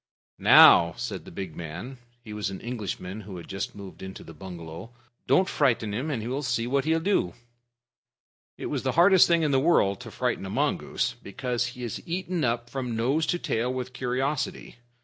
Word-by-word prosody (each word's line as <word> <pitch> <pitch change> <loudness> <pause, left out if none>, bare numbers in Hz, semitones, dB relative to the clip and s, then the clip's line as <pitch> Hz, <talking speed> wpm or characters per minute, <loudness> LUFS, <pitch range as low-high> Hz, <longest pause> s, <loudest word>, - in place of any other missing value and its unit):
"Now," 85 -1 +8
said - - -5
the - - -10
big 95 -5 -6
man 90 - -7 0.2
(he 110 -2 -8
was 105 -2 -2
an 95 - -6
Englishman 110 -4 -5
who 95 -2 -9
had 85 - -9
just 95 +1 -4
moved 100 -2 -10
into 95 0 -8
the 80 - -11
bungalow), 85 +2 -9 0.4
"don't 145 +9 +4
frighten 115 - +1
him, 130 +9 -2
and 115 -6 -3
we'll 135 +4 -2
see 120 -4 -1
what 135 +3 0
he'll 160 +1 +2
do." 165 - 0 1.2
It - - -6
is - - -2
the - - -1
hardest 180 +2 +6
thing 170 -1 +3
in 150 - +2
the 135 - +4
world 115 - +3
to - - -9
frighten - - -2
a - - -6
mongoose, - - 0
because 125 +4 -2
he 125 - -6
is 115 - -4
eaten 180 -1 -2
up 120 -1 0
from 125 -2 -4
nose 135 +8 +1
to 175 - +1
tail 125 -6 -1
with 125 0 -4
curiosity. 130 +2 -2
120 Hz, 190 wpm, -27 LUFS, 100-140 Hz, 1.2 s, Now